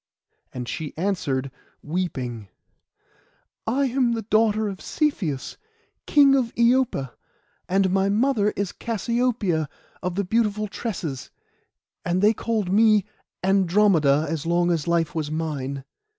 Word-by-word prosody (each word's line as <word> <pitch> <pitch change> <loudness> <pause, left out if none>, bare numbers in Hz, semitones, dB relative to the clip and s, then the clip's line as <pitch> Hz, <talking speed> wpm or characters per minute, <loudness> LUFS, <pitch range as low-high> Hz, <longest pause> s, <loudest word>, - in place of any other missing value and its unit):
And 125 -1 -6
she 155 +3 -5
answered, 145 -8 -1 0.3
weeping— 130 - -3 1.2
'I 270 +5 +2
am 255 -1 +1
the 225 -1 -3
daughter 215 0 +2
of 195 -2 -6
Cepheus, 190 - -2 0.5
King 280 -2 +6
of 255 -4 +1
Iopa, 235 - +2 0.6
and 190 0 +2
my 195 +1 +2
mother 215 0 +2
is 200 -2 -2
Cassiopoeia 230 - -1 0.3
of 180 -1 -3
the 200 - 0
beautiful 215 +1 0
tresses, 185 - -5 0.7
and 175 +1 0
they 215 +2 +6
called 220 -4 -2
me 215 -1 +4 0.4
Andromeda, 185 -6 +3
as 160 0 -3
long 175 +1 +2
as 165 -3 -1
life 170 -2 +1
was 155 -3 -2
mine. 140 -4 -3
195 Hz, 120 wpm, -24 LUFS, 160-225 Hz, 1.2 s, King